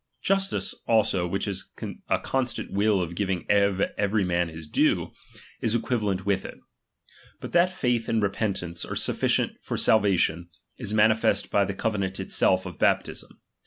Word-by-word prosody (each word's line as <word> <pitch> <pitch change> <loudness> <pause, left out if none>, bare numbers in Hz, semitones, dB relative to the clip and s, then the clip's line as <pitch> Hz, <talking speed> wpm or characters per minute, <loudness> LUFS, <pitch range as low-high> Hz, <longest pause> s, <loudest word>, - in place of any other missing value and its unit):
Justice, 195 0 +1
also, 100 -6 +2
which 95 +4 -2
is 95 -2 -5 0.4
a - - +3
constant 130 -2 -2
will 100 -1 +2
of 85 0 -6
giving 95 -1 -2
to 100 -1 +2
every 100 0 +1
man 85 -1 0
his 80 0 -9
due, 75 - +1 0.5
is 115 0 +1
equivalent 105 -6 -1
with 100 -1 +1
it. - - -8 0.8
But - - -7
iha.tj'aith 140 -10 +2
and 115 - +2
repeatnnce 95 -4 -2
are - - -3
sufficient - - 0
for - - -4
salvation, 90 -5 +2 0.3
is 115 -5 -3
manifest 110 -1 +2
by 100 -1 +3
the 100 - -4
cove 105 0 -1
nant 95 0 -2
itself 95 0 +1
of 90 -3 -8
baptism. - - -1
100 Hz, 155 wpm, -26 LUFS, 95-110 Hz, 0.8 s, a